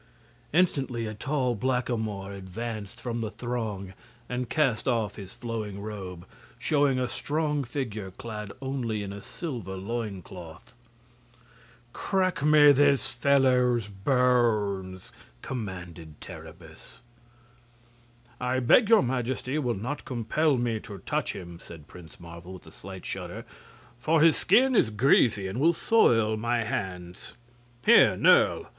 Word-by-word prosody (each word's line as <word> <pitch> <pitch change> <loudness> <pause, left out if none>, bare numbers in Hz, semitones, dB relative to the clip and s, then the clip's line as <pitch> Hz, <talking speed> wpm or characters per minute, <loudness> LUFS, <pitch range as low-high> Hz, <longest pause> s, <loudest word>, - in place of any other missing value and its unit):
Instantly 135 -9 +1
a 110 - -4
tall 130 +2 -1
blackamoor 110 -4 -2
advanced 100 +2 -6
from 120 -2 -4
the 110 - -2
throng 110 -6 -4 0.3
and 125 -1 -3
cast 135 -8 +1
off 115 -5 0
his 100 -2 -9
flowing 115 -4 -5
robe, 95 -4 -7 0.3
showing 140 +1 +2
a 125 -1 0
strong 150 +1 -1
figure 115 -6 -4
clad 105 +1 -7
only 120 -6 -2
in 100 0 -6
a 100 - -8
silver 115 - -6
loincloth. 95 -4 -7 1.2
"Crack 185 -4 0
me 150 0 +7
this 140 0 +3
fellow's 125 -3 +3
bones!" 105 -4 0 0.3
commanded 90 - -7
Terribus. 80 +6 -11 1.4
"I 125 +1 0
beg 200 - +5
your 225 -8 +6
Majesty 130 +3 -2
will 125 -5 -1
not 125 +9 -4
compel 135 +4 0
me 120 -2 -1
to 105 -3 -9
touch - - -2
him," 85 -3 -9
said 80 -3 -12
Prince 85 -2 -14
Marvel, 85 +1 -10
with 90 - -12
a 80 - -13
slight 95 +2 -10
shudder; - - -6 0.5
"for 155 +5 +2
his 165 -1 +6
skin 260 +1 +4
is 125 - +4
greasy, 110 -3 +3
and 95 +6 -4
will 165 +4 +4
soil 115 - +3
my 120 +1 0
hands. 90 -4 -5 0.5
Here, - - +6
Nerle!" - - +4
115 Hz, 125 wpm, -27 LUFS, 95-130 Hz, 1.4 s, me